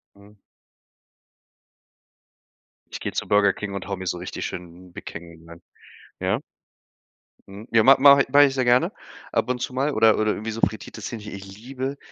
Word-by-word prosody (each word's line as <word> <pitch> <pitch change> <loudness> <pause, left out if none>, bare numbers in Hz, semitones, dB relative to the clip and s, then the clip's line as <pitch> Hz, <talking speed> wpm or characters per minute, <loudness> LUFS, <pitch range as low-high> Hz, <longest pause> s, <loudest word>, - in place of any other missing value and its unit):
Mhm. 100 +1 -19 2.6
Ich - - -6
gehe - - -4
zu - - -3
Burger 100 -1 +4
King 105 -1 -6
und 100 - -6
haue 100 - -3
mir 95 0 -7
so 90 - -2
richtig 90 - -6
schön 90 +1 -8
'n - - -24
Big - - -10
King 85 -1 -10
rein, 85 0 -13 0.6
ja? - - 0 1.1
Mhm. 100 +4 -11
Ja, 115 -1 +4
ma 135 +3 +7
mache 140 0 +8
i - - +1
mache 145 0 +7
ich 135 - 0
sehr 130 - +1
gerne 125 +1 +3 0.4
ab - - 0
und 125 -1 -1
zu 125 - -4
mal 140 +3 0
oder 110 -3 +4
oder 110 0 +1
irgendwie 110 +2 -4
so 115 - -6
frittiertes 110 - -3
Hähnchen 105 -3 -8
ich 100 0 -10
liebe 130 +3 -5
110 Hz, 190 wpm, -23 LUFS, 95-125 Hz, 2.6 s, mache